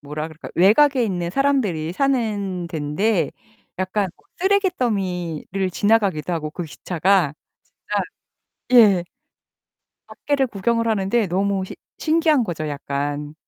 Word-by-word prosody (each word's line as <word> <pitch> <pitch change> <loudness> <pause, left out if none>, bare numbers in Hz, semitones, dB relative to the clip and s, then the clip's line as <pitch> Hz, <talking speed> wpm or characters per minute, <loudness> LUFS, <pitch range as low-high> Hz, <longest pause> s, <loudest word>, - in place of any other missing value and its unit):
뭐라 150 +2 -5
그럴까 155 0 -10
외곽에 255 - +5
있는 175 -5 -2
사람들이 205 - 0
사는덴데 195 - 0 0.5
약간 190 +1 0 0.3
쓰레기 385 +1 +3
더미를 185 - -2
지나가기도 200 -5 +1
하고 155 -2 -3
그 175 +3 -5
기차가 175 +1 +1 1.4
진짜 250 -2 +8 0.2
예. 175 - -5 1.0
밖에를 280 -2 -1
구경을 230 +2 0
하는데 215 +1 +1
너무 195 +1 0
시 - - -8 0.2
신기한 315 -4 +3
거죠 155 -5 -4
약간. 145 +1 -4
190 Hz, 265 characters per minute, -22 LUFS, 165-230 Hz, 1.4 s, 진짜